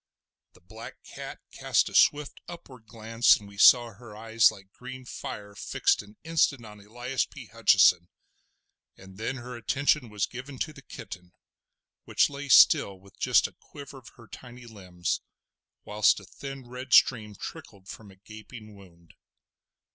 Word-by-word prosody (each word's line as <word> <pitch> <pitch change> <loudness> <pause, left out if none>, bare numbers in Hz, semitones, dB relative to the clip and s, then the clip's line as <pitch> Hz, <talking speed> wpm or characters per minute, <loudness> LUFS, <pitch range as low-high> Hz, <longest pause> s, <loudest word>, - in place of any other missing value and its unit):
The - - -22
black 110 +6 -12
cat - - -10
cast - - 0
a - - -9
swift 145 0 +2
upward 130 -9 -12
glance, 115 +1 +2
and 105 - -14
we 100 0 -14
saw 120 +1 +6
her 105 0 -14
eyes 110 0 +3
like 95 0 -16
green 130 +2 -11
fire 100 -4 -8
fixed - - 0
an 105 +1 -18
instant 155 -6 0
on 105 -1 -13
Elias 120 +5 -4
P. - - -13
Hutcheson; 85 -1 +4 0.9
and 95 +1 -15
then 115 +4 -3
her 125 -1 -9
attention 125 +3 0
was 105 -1 -2
given 130 +2 -10
to 155 +4 -4
the 140 - -14
kitten, 95 -9 -11 0.7
which - - +1
lay 140 0 -8
still 100 -5 +5
with 100 +1 -21
just - - +3
a - - -6
quiver 140 -1 -12
of 125 - -17
her 115 - -16
tiny 120 +1 -13
limbs, 90 -6 -5 0.6
whilst 105 0 +2
a - - -15
thin 135 +4 -10
red 125 +1 -7
stream 105 -4 +4
trickled 95 0 -11
from 105 0 -11
a 95 - -17
gaping 110 +2 -13
wound. 85 -4 -19
115 Hz, 160 wpm, -27 LUFS, 100-125 Hz, 0.9 s, saw